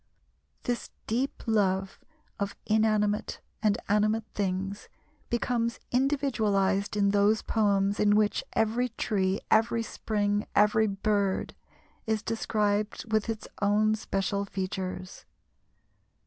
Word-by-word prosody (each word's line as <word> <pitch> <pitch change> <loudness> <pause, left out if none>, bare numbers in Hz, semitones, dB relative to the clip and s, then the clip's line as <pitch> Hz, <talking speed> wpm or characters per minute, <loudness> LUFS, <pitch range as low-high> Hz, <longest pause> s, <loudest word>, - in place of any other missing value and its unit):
This 245 -1 -2 0.2
deep 255 +6 -2
love 195 -4 +1 0.4
of 200 0 -2
inanimate 215 -1 +1 0.2
and 215 -1 +2
animate 215 +2 +2
things 195 0 -3 0.4
becomes 235 -1 0
individualized 215 -8 +1
in 200 -1 +3
those 205 +2 +3
poems 200 -2 +1
in 205 0 +4
which 210 -1 +2
every 230 +3 +1
tree, 195 -4 -1
every 230 +1 +3
spring, 205 -2 -1
every 210 +1 +4
bird 200 -1 0 0.5
is 220 -1 0
described 215 0 -1
with 215 0 +1
its 220 -1 -4
own 210 +1 +3
special 200 -1 -1
features. 185 -1 -5
210 Hz, 105 wpm, -28 LUFS, 200-220 Hz, 0.5 s, in